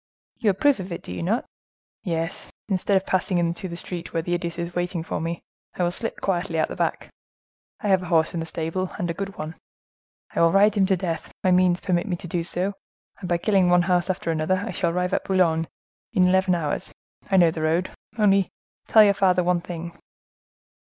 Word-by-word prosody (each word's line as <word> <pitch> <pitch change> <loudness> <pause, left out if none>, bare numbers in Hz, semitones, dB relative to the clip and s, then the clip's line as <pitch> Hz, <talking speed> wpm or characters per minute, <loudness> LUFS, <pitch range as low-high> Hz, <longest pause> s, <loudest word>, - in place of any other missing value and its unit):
"You 220 - +2
approve 260 +6 +3
of 185 0 -6
it, 170 - -5
do - - -8
you 90 - -5
not?" 85 - 0 0.6
"Yes, 165 0 -3 0.2
instead 195 0 +2
of 190 - -2
passing 185 0 +1
into 170 +3 -1
the 170 - -6
street, 175 -1 -4
where 165 - -1
that 175 - -4
idiot 175 -1 -2
is 170 0 -4
waiting 175 -1 -2
for 160 - -3
me, 165 +1 -4 0.3
I 180 - -1
will 175 - +1
slip 225 +5 -4
quietly 175 -3 -1
out 155 - +3
at - - -2
the - - -5
back. - - -2 0.7
I 210 - -1
have 190 -1 +4
a 180 - -7
horse 160 -1 +2
in 170 - -2
the 165 - -4
stable, 165 +4 -3
and 175 -1 -1
a - - -3
good 195 +3 -6
one. 155 +1 -5 0.8
I - - +1
will 165 0 +5
ride 200 +3 +5
him 195 -3 +2
to 190 -1 +2
death; 165 -3 -4
my 185 - +3
means 180 -1 +3
permit 180 +1 0
me 185 - -1
to 175 - -8
do 170 +1 -1
so, 180 +4 -1 0.5
and 180 - -6
by 175 - +2
killing 190 0 +3
one 175 0 +5
horse 180 0 +1
after 180 -2 -1
another, 165 +5 0
I - - -4
shall 170 - 0
arrive 180 +2 -1
at - - 0
Boulogne 165 -4 +2 0.5
in 180 -1 +4
eleven 190 0 +3
hours; 165 +2 -2 0.4
I 195 - +3
know 170 -3 +6
the 160 - -5
road. 165 +4 +1 0.3
Only 195 -3 +3 0.4
tell 220 - +7
your 200 -1 +5
father 185 -2 +3
one 175 0 +1
thing." 170 -1 -7
180 Hz, 225 wpm, -24 LUFS, 170-190 Hz, 0.8 s, tell